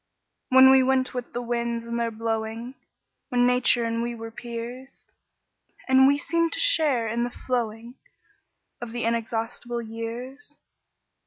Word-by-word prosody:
When 260 0 +8
we 265 0 +6
went 260 0 +1
with 250 -1 -5
the 245 - -4
winds 235 -1 -2
in 235 0 -4
their 235 0 0
blowing, 225 +2 -4 0.6
When 245 -2 +2
Nature 250 -1 +3
and 230 0 -1
we 235 0 -3
were 225 0 -8
peers, 240 +3 -8 0.8
And 265 0 +6
we 285 +1 +4
seemed 335 +2 0
to - - -2
share 305 - +4
in 230 +2 -1
the 240 - -2
flowing 235 -2 -4 0.9
Of 235 -1 -7
the 240 - -3
inexhaustible 230 +1 -3
years? 240 +6 -7
240 Hz, 145 wpm, -25 LUFS, 230-260 Hz, 0.9 s, When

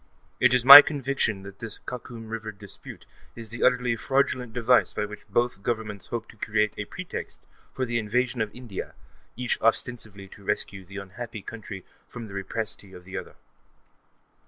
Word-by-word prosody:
It 125 - +5
is 125 -1 +2
my 140 +2 +15
conviction 135 -9 -1
that 100 0 -11
this 115 -2 -5
Khakum 120 -2 -8
River 110 -1 -5
dispute 100 -1 -11 0.3
is 115 -1 -9
the 120 - -7
utterly 125 -2 +3
fraudulent 130 0 0
device 120 -4 +3
by 105 - -1
which 105 0 -11
both 120 -1 0
Governments 110 -3 -3
hope 115 -2 -4
to - - -15
create 105 0 0
a - - -4
pretext - - -7 0.3
for 130 - -2
the 120 -1 -1
invasion 120 +2 0
of 110 - -1
India, 120 -5 -7 0.4
each 125 -1 0
ostensibly 110 -3 -1
to 100 - -15
rescue 100 -1 -2
that 100 +2 -8
unhappy 105 +2 -8
country 105 -4 -8 0.2
from 120 -2 -8
the 100 - -11
rapacity 100 0 -4
of 90 - -12
the 95 - -9
other. - - -6
110 Hz, 170 wpm, -26 LUFS, 100-120 Hz, 0.4 s, my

